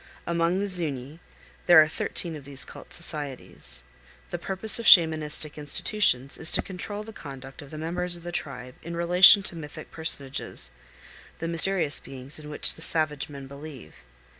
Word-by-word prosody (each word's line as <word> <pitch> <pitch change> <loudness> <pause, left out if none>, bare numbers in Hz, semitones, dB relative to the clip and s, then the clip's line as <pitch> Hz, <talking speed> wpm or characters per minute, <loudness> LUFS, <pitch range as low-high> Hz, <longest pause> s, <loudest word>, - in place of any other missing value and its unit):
Among 170 +1 0
the 200 - -1
Zuñi 155 -6 -5 0.5
there 175 -2 +9
are 155 - +6
thirteen 165 +1 -3
of 150 - -9
these 140 0 0
cult - - -12
societies. 135 - -1 0.5
The 175 - -4
purpose 195 +5 +1
of 230 - -3
Shamanistic 155 -3 +4
institutions 145 -2 -1
is 160 - -1
to - - +1
control 205 +3 -6
the 220 +1 -11
conduct 135 -5 -10
of 145 - -12
the 155 - -9
members 175 +3 -3
of 170 - -12
the 175 - -6
tribe 125 -6 -6
in 170 +1 -7
relation 180 +4 +7
to 175 - -3
mythic 150 -3 -9
personages, 140 -4 -1 0.7
the 165 - -4
mysterious 165 -2 0
beings 135 +2 -6
in 150 -1 -10
which 150 - +6
the - - -8
savage 155 -4 +2
men 140 -2 -9
believe. 140 - -11
160 Hz, 165 wpm, -26 LUFS, 140-175 Hz, 0.7 s, there